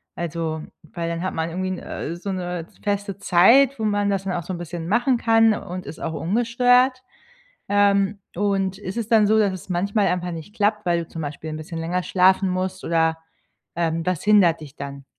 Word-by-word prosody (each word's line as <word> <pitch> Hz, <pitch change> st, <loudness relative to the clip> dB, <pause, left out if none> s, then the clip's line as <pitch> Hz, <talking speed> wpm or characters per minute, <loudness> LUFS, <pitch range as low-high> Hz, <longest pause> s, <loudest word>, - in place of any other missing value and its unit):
Also, 165 Hz, -2 st, -3 dB, 0.2 s
weil 165 Hz, +2 st, -5 dB
dann 170 Hz, 0 st, -3 dB
hat 185 Hz, -, -2 dB
man 160 Hz, 0 st, -2 dB
irgendwie 185 Hz, +2 st, -3 dB
‘n 185 Hz, -, -3 dB
äh, 165 Hz, -, -5 dB
so 195 Hz, +3 st, -5 dB
‘ne 180 Hz, -2 st, -4 dB, 0.2 s
feste 200 Hz, -1 st, -2 dB
Zeit, 240 Hz, +10 st, +5 dB
wo 220 Hz, -, -1 dB
man 205 Hz, -1 st, +1 dB
das 195 Hz, -1 st, -1 dB
dann 190 Hz, -, -2 dB
auch 175 Hz, -, -3 dB
so 185 Hz, -, -5 dB
‘n 175 Hz, -, -5 dB
bisschen 170 Hz, -1 st, -6 dB
machen 240 Hz, +5 st, +2 dB
kann 225 Hz, -1 st, +4 dB
und 185 Hz, -1 st, -7 dB
ist 160 Hz, -, -9 dB
auch 160 Hz, -, -4 dB
ungestört. 245 Hz, +7 st, +2 dB, 0.7 s
Ähm, 200 Hz, 0 st, +2 dB, 0.2 s
und 195 Hz, -1 st, 0 dB
ist 195 Hz, +1 st, -6 dB
es 230 Hz, -2 st, -3 dB
dann 220 Hz, -3 st, +5 dB
so, 220 Hz, +1 st, +3 dB
dass 205 Hz, -3 st, +3 dB
es 185 Hz, -1 st, -9 dB
manchmal 200 Hz, +3 st, +1 dB
einfach 180 Hz, 0 st, -1 dB
nicht 165 Hz, +5 st, -8 dB
klappt, 210 Hz, -1 st, 0 dB
weil 170 Hz, -1 st, +2 dB
du -, -, -23 dB
zum 165 Hz, -, -6 dB
Beispiel 150 Hz, +2 st, -6 dB
‘n 155 Hz, -, -5 dB
bisschen 165 Hz, +1 st, -7 dB
länger 175 Hz, +3 st, -1 dB
schlafen 190 Hz, +1 st, +3 dB
musst 185 Hz, 0 st, -3 dB
oder, 160 Hz, -1 st, +1 dB, 0.6 s
ähm, 165 Hz, -1 st, -1 dB
was 180 Hz, -4 st, -1 dB
hindert 200 Hz, -6 st, +4 dB
dich 150 Hz, -1 st, -11 dB
dann? 140 Hz, 0 st, -7 dB
185 Hz, 210 wpm, -23 LUFS, 170-205 Hz, 0.7 s, Zeit